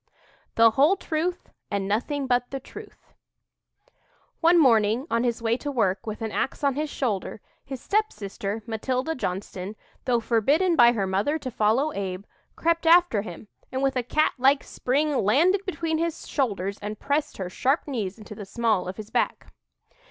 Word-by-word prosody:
"THE 230 0 +6
WHOLE 290 - +4
TRUTH 350 0 -3 0.2
AND 200 -1 -2
NOTHING 270 +7 -1
BUT 245 -1 +1
THE 270 - -4
TRUTH" - - -13 1.3
One 340 +1 +5
morning, 230 -3 +4
on 230 +1 +2
his 235 -1 -1
way 230 +1 +2
to 290 - -5
work, 200 -6 0
with 215 +1 -5
an 220 - -3
ax 270 - -2
on 280 -1 +3
his 300 +3 -2
shoulder, 215 -9 -2 0.2
his 265 -2 -7
stepsister, 210 - -2
Matilda 255 +6 -2
Johnston, 190 - -4 0.3
though 245 -2 +2
forbidden 280 - +2
by 240 -4 +7
her 205 -4 -1
mother 200 +11 0
to 260 -5 -6
follow 235 +8 +1
Abe, 190 0 -4 0.3
crept 335 0 0
after 340 - +5
him, 200 0 -9 0.2
and 260 +1 -2
with 270 -1 +1
a 250 - +1
cat 305 +6 +1
like 270 +2 +4
spring 285 +3 0
landed 340 - +3
between 330 -3 -1
his 335 -1 -3
shoulders 200 -7 -1
and 210 0 -5
pressed 290 +1 -1
her 190 - -4
sharp 265 - 0
knees 215 -8 -3
into 215 -1 -10
the 210 - -8
small 220 -4 0
of 185 - -6
his 215 -1 -9
back. - - -1
245 Hz, 170 wpm, -25 LUFS, 210-295 Hz, 1.3 s, by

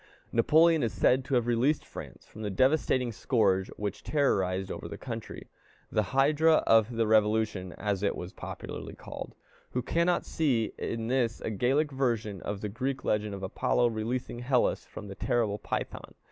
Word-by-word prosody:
Napoleon 160 +7 +5
is 115 - 0
said 130 +1 +3
to 135 0 0
have 120 -2 +2
released 120 +6 +1
France - - -10
from 110 - -12
the 105 - -2
devastating 130 +2 +2
scourge 100 -5 +1
which 105 -1 -4
terrorized 95 -10 +1
over - - -6
the - - -7
country, - - -7 0.4
the 110 - +2
hydra 150 +4 +4
of 115 +1 +4
the 115 0 +2
revolution, 110 -3 +2
as 100 -2 -2
it 100 - +1
was 90 +1 -7
popularly - - -7
called. - - -8 0.4
Who 125 - -1
cannot 170 +6 +1
see 125 -9 0
in 115 -1 -3
this 120 -2 0
a - - -3
Gallic 135 +8 +1
version 115 -7 -1
of 100 0 -4
the 105 - -2
Greek 130 +5 -3
legend 105 -1 0
of 95 - -8
Apollo 120 +5 +1
releasing 120 +2 -3
Hellas 125 0 +1
from 105 - -9
the 100 - -7
terrible 110 -2 0
Python? - - -5
115 Hz, 170 wpm, -29 LUFS, 105-130 Hz, 0.4 s, Napoleon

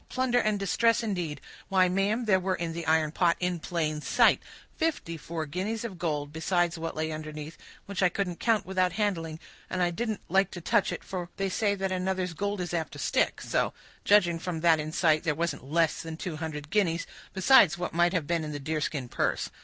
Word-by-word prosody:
Plunder 255 -1 +1
and 215 -2 +1
distress, 230 +4 +2
indeed! 175 -9 -3 0.3
Why, 185 -1 +4
ma'am, 200 +6 +1
there 190 -3 +4
were 185 0 0
in 170 -1 -3
the 165 -1 -5
iron 160 -1 +3
pot, 170 +1 +2
in 180 -1 -1
plain 155 -2 -2
sight, - - +4 0.3
fifty 315 - -1
four 165 0 -5
guineas 200 +9 -3
of 190 -6 -7
gold, 150 -4 -2
besides 175 +1 +1
what 165 0 -4
lay 160 0 -2
underneath, 155 0 -6 0.3
which 200 -1 -4
I 180 - +5
couldn't 180 -1 -3
count 220 -4 +2
without 185 -1 +1
handling; 165 -6 -1 0.3
and 185 - -2
I 175 - +2
didn't 220 +3 -3
like 195 0 +3
to - - -4
touch 205 +4 +2
it, - - -5
for 180 -2 -5
they 195 0 0
say 205 +1 +1
that 195 -1 -2
another's 185 -1 -1
gold 200 +3 -2
is 175 -1 -4
apt 165 -3 -2
to - - -8
stick—so, 140 - 0 0.3
judging 180 -5 +4
from 165 -1 -4
that 165 -2 +5
in 155 0 -4
sight, 155 -2 +3
there 155 -4 0
wasn't 165 -4 -2
less 165 0 +2
than 160 -1 -6
two 165 -2 -5
hundred 150 -2 -6
guineas, 175 -5 +1 0.3
besides 195 -3 +6
what 180 - -4
might 175 +2 +3
have 170 -5 0
been 165 +1 0
in 150 -1 -5
the 145 - -4
deerskin 150 -2 -2
purse. - - -1
175 Hz, 210 wpm, -28 LUFS, 160-195 Hz, 0.3 s, besides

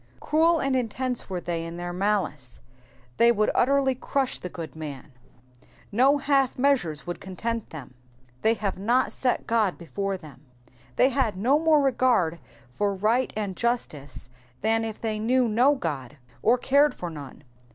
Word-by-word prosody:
Cruel 325 +2 +3
and 275 -2 0
intense 250 0 -2
were 185 -2 -2
they 170 -1 -3
in 165 +1 -7
their 175 0 -5
malice, 180 -9 -2 0.6
they 235 0 +6
would 215 -2 +1
utterly 270 +1 +3
crush 265 +1 -1
the 180 - -6
good 165 -2 -8
man; 145 -3 -8 0.8
no 265 +7 +4
half 275 -2 +1
measures 245 - +1
would 175 - -5
content 225 +4 -4
them. 140 -5 -10 0.3
*^'' 125 +1 -32
They 225 +1 +3
have 200 -4 -3
not 240 +6 +2
set 250 -2 0
Ood 220 -5 +1
htfore 195 +5 -3
them,'*'' 145 -6 -14 0.5
They 260 - +4
had 240 -7 0
no 260 +9 +3
more 315 -2 +4
regard 240 -11 +2 0.3
for 200 +8 -1
right 225 +6 +1
and 200 -3 -3
justice 150 - -3 0.3
than 225 +1 +2
if 220 -1 -5
they 220 -2 -2
knew 245 +3 +2
no 245 +6 +4
God, 145 - -5 0.2
or 240 +3 +4
cared 280 +4 +3
for 175 -1 -6
none. 145 -3 -10
220 Hz, 160 wpm, -26 LUFS, 175-255 Hz, 0.8 s, they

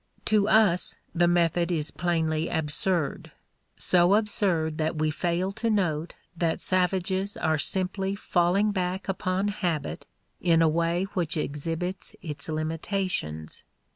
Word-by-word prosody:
To 210 -1 +3
us, 205 -5 +3 0.2
the 175 0 +3
method 175 0 +2
is 155 -3 -1
plainly 160 -2 0
absurd 160 +1 0 0.5
so 180 +2 +4
absurd 180 -7 +1
that 160 +1 0
we 155 0 0
fail 175 +4 -1
to 230 +3 -2
note 175 -7 0 0.2
that 165 -1 0
savages 185 +2 0
are 155 -1 +1
simply 190 +4 -1
falling 195 +2 +2
back 185 -1 -2
upon 190 +1 -1
habit 175 -6 -3 0.3
in 165 -2 +4
a - - +5
way 170 +3 +1
which 170 -4 -1
exhibits 165 +5 -3
its 150 -2 -4
limitations. 155 - -3
175 Hz, 125 wpm, -27 LUFS, 160-190 Hz, 0.5 s, a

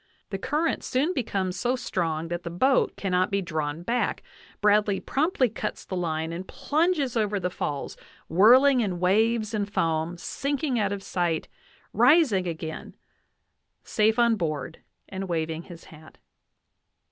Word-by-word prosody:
The 195 - -3
current 310 +9 -1
soon 285 +8 0
becomes 190 - -2
so 245 +4 +1
strong 165 -8 -2
that 175 0 -3
the 170 - -6
boat 260 +11 +2
cannot 185 -2 +1
be 200 - 0
drawn 155 -3 -3
back; 240 +6 -1 0.4
Bradley 205 -1 +3
promptly 280 -2 +1
cuts 220 - -5
the 185 - -5
line 160 -2 -2
and 180 +3 -6
plunges 305 -5 0
over 210 -2 0
the 180 -1 -2
falls, 145 -5 -4 0.3
whirling 250 +9 +6
in 190 -6 -1
waves 215 +4 +2
and 205 -1 -2
foam, 165 -1 0
sinking 275 - -2
out 200 -1 0
of 200 -1 -4
sight, 175 -4 -1 0.5
rising 240 - +4
again, 160 -1 -6 0.9
safe 220 +1 +2
on 235 -2 +4
board 155 -4 -3 0.3
and 190 -1 -6
waving 160 0 -2
his 170 -2 -11
hat. 155 0 -15
195 Hz, 145 wpm, -26 LUFS, 170-240 Hz, 0.9 s, whirling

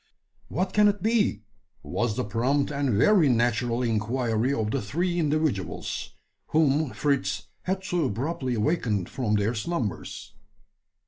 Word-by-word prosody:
"What 185 +5 -2
can 210 0 +5
it 205 -2 0
be?" 215 - +2 0.4
was 120 -3 -1
the - - 0
prompt 130 +8 0
and 140 -5 0
very 170 - +5
natural 120 0 +1
inquiry 115 +2 0
of 110 -5 -1
the - - 0
three 175 - -1
individuals, 150 - -1 0.3
whom 155 -1 +2
Fritz 140 +2 -1
had 190 +1 -2
so 175 -4 0
abruptly 130 +2 -2
awakened 105 - 0
from 115 -5 -1
their 105 +3 +1
slumbers. 120 - -4
130 Hz, 130 wpm, -26 LUFS, 115-160 Hz, 0.4 s, can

